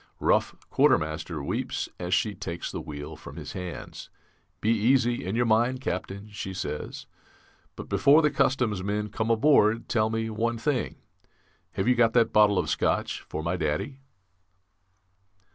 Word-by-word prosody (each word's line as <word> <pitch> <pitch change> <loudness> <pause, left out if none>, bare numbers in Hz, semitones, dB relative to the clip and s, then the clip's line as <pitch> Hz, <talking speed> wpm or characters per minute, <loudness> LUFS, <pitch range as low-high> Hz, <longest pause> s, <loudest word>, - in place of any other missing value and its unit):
Rough - - +2 0.2
quartermaster 80 0 +1
weeps - - -2
as 90 0 -4
she 105 +2 +2
takes 85 -3 -5
the - - -5
wheel 75 +1 -7
from - - -11
his - - -7
hands. 90 -2 -7 0.5
'Be 110 - +1
easy 120 +2 +2
in 95 +4 -3
your 120 +1 +2
mind, 120 +3 +2
Captain,' 100 -3 -4
she 95 -2 -6
says; 75 -5 -5 0.7
'but - - -8
before 150 +3 +5
the 150 - +3
customs 120 -7 +1
men 105 +2 -2
come 110 +2 -2
aboard 115 -2 +4
tell 110 -2 +1
me 110 0 -1
one 115 +2 -1
thing 130 +2 -1 0.8
have 95 - -1
you 125 - +6
got 115 -2 +3
that 115 -2 +3
bottle 105 -2 +5
of - - 0
Scotch - - 0
for 80 - -6
my 85 +3 -1
Daddy?'" 80 - -2
110 Hz, 155 wpm, -27 LUFS, 90-120 Hz, 0.8 s, you